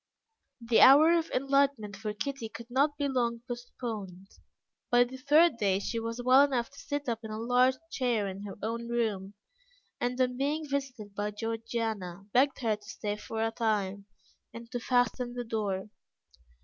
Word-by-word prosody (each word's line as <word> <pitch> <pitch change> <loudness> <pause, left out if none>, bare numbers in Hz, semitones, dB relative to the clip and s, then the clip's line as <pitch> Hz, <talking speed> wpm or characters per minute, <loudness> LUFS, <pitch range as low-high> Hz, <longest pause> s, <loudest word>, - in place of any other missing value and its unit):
The 230 -1 +3
hour 295 +5 +8
of 335 -1 +1
enlightenment 275 -6 +1
for 210 +2 -4
Kitty 240 +1 -4
could 235 +2 -11
not 285 +3 +2
be 285 - 0
long 235 -3 0
postponed. 220 -6 -6 0.6
By 245 0 +6
the 255 +2 -8
third 295 +2 +4
day 200 -4 +2
she 230 +4 -3
was 230 +1 -4
well 260 +2 +7
enough 260 -4 0
to 280 - -14
sit 285 0 -4
up 230 -2 -1
in 220 - -7
a 215 - -5
large 250 +3 +3 0.2
chair 240 -6 0
in 195 +1 -6
her 200 -1 -7
own 230 +2 -3
room, 210 -4 -2 0.6
and 245 +1 -2
on 250 -1 +1
being 295 +3 -1
visited 265 -7 -4
by 205 +1 -2
Georgiana, 220 -4 -4
begged 270 +2 +3
her 220 -3 +1
to - - -30
stay 205 -2 -3
for 220 +1 -4
a 225 - -1
time, 205 -4 -1 0.4
and 230 0 -11
to 245 - -2
fasten 245 0 0
the 245 - -3
door. 210 -3 -3
235 Hz, 175 wpm, -30 LUFS, 210-260 Hz, 0.6 s, hour